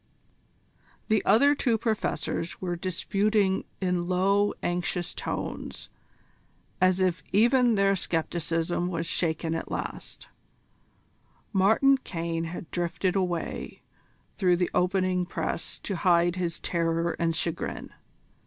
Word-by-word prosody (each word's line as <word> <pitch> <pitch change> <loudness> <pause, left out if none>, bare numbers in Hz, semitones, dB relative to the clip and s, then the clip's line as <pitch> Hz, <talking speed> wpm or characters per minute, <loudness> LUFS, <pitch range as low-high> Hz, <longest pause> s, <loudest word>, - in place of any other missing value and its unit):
The 215 -1 +3
other 280 +6 +6
two 245 -5 +1
Professors 220 -6 -2
were 175 -2 -2
disputing 195 +3 0
in 180 -2 0
low, 195 +3 +2
anxious 175 0 -1
tones, - - -5 0.9
as 185 0 +4
if 185 -2 +1
even 240 +3 +4
their 195 0 +3
scepticism 165 0 -1
was 170 -2 -2
shaken 165 -1 -1
at 165 - -4
last: - - -6 1.3
Martin 220 +8 +4
Caine 165 -6 -3
had 165 -1 -7
drifted 175 +2 -1
away 180 -3 -3 0.5
through 180 -3 +3
the 175 0 0
opening 185 0 +1
press 170 -1 -3
to 195 - -3
hide 175 0 +3
his 175 -3 -2
terror 165 -1 0
and 165 -1 +1
chagrin. 165 -1 -3
180 Hz, 110 wpm, -27 LUFS, 170-195 Hz, 1.3 s, other